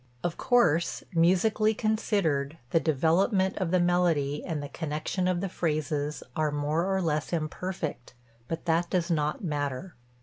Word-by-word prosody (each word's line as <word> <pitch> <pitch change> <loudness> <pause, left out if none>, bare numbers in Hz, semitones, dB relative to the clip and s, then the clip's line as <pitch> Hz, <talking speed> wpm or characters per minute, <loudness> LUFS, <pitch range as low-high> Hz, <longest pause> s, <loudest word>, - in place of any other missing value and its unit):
Of 175 -1 -1
course, 175 -10 +2
musically 195 +6 +3
considered, 195 -10 0
the 165 - +4
development 175 - +2
of 185 -3 0
the 185 +1 +3
melody 170 -5 +1
and 155 -4 -3
the - - -4
connection 160 +5 -2
of 180 -1 +1
the 195 - -1
phrases 150 -4 -2
are 155 -1 +1
more 150 +6 0
or 190 -1 +1
less 155 -2 -1
imperfect; 160 -5 -4 0.3
but 165 +1 -4
that 170 +1 +1
does 180 -1 0
not 150 +3 0
matter. 145 +1 -3
165 Hz, 145 wpm, -28 LUFS, 150-185 Hz, 0.3 s, the